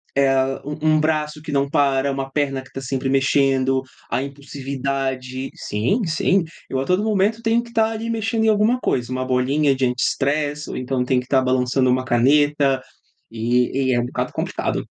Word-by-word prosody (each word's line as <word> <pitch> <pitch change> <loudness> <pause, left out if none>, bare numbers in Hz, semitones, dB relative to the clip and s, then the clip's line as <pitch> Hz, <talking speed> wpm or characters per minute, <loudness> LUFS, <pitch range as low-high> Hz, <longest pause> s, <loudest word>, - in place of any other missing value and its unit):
eh, 135 -1 +3 0.3
um 155 +1 +1
um - - +3
braço 150 -1 -1
que 155 -1 -7
não 140 0 +1
para, 140 -2 +2
uma 135 0 -4
perna 135 -2 -1
que 130 - -16
está 135 - -7
sempre 135 0 -2
mexendo, 135 -1 +2 0.3
a 130 - 0
impulsividade 135 -2 -4
sim, 115 - -1
sim, 170 +3 +2 0.3
eu 130 - -1
a 135 - -2
todo 185 +6 +1
momento 215 +1 +1
tenho 230 +1 +2
que 235 - -13
estar 225 -1 +2
ali 225 +1 -4
mexendo 225 0 0
em - - +4
alguma 215 +4 +3
coisa, 125 - -1
uma 130 0 -2
bolinha 135 +3 +2
de 130 0 +1
anti-stress 145 +4 -1
ou - - -5
então 130 0 -1
tem 125 0 +1
que 125 - -7
estar 130 +1 +2
balançando 130 0 +1
uma 130 0 +1
caneta, 140 +2 +3 0.5
e 125 +3 0
e - - +3
é 120 - +2
um 120 - -1
bocado - - -3
complicado. - - -2
135 Hz, 190 wpm, -21 LUFS, 130-155 Hz, 0.5 s, em